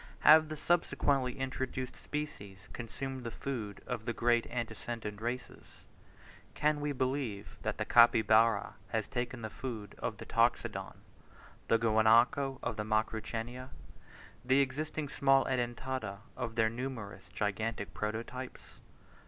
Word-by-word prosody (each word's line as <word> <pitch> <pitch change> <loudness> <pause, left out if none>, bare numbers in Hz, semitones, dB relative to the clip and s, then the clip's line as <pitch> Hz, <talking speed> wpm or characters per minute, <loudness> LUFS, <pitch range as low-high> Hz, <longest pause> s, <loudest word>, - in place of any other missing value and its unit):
Have 155 0 +8
the 155 - -3
subsequently 140 -6 +1
introduced 130 -1 -3
species 100 -10 -6
consumed 130 +2 -5
the 115 - -3
food 115 -6 -5
of 110 - -4
the 120 - -1
great 120 +1 +2
antecedent 115 -2 -4
races? 120 +2 -5 0.7
Can 150 0 +2
we 145 0 0
believe 130 -6 -2
that - - -2
the - - -1
Capybara 115 -2 +5
has - - -1
taken 120 -1 -3
the 110 - -3
food 115 -6 -6
of - - -3
the - - -8
Toxodon, - - +1 0.7
the 115 - +5
Guanaco 115 +5 +4
of - - -2
the 105 - -1
Macrauchenia, 115 +3 -2 0.7
the 130 +2 +4
existing 150 +3 -1
small 135 -1 +3
Edentata 120 -4 -2
of 120 -3 -4
their 110 -1 +4
numerous 115 -3 -5
gigantic 105 +1 -2
prototypes? 115 +4 -5
120 Hz, 125 wpm, -33 LUFS, 110-130 Hz, 0.7 s, Have